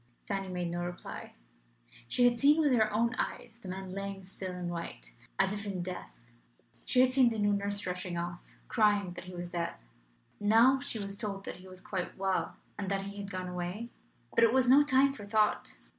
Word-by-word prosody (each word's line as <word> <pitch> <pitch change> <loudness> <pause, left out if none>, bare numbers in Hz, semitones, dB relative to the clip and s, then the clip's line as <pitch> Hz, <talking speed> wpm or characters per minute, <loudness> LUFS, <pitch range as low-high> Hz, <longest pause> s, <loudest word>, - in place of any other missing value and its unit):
Fanny 195 -1 -2
made 180 -2 -2
no 175 0 -2
reply. 175 0 -7 0.7
She 245 - +2
had 240 -1 +1
seen 295 +4 +6
with 300 -3 +4
her 220 -3 +3
own 230 +3 +2
eyes 235 -1 -3
the 195 - -10
man 185 0 -5
lying 195 0 -5
still 190 0 -6
and 180 -1 -4
white, 170 - -6 0.2
as 195 +1 +3
if 205 -1 -4
in 195 -4 -3
death; 180 0 -6 0.7
she 250 - +4
had 255 0 +4
seen 255 -2 +6
the 225 - -3
new 205 -1 +3
nurse 200 0 -1
rushing 180 -1 -3
off, 175 0 -4 0.3
crying 205 -5 +2
that 175 - -8
he 180 0 -9
was 175 0 -5
dead. 170 - -3 0.6
Now 230 +6 +5
she 280 -4 -2
was 200 -1 -4
told 200 -2 -4
that - - -5
he 185 +1 -13
was 185 0 -11
quite 185 -3 -4
well, 190 -1 0 0.2
and 195 -2 -2
that 195 -1 0
he 200 +1 -7
had 200 -1 -5
gone 185 -2 -4
away! 180 +6 -4 0.4
But 230 - +4
it 230 - +6
was 260 0 +3
no 270 +3 +8
time 275 -1 +4
for 220 - -9
thought. 215 0 +2
200 Hz, 210 wpm, -31 LUFS, 180-230 Hz, 0.7 s, no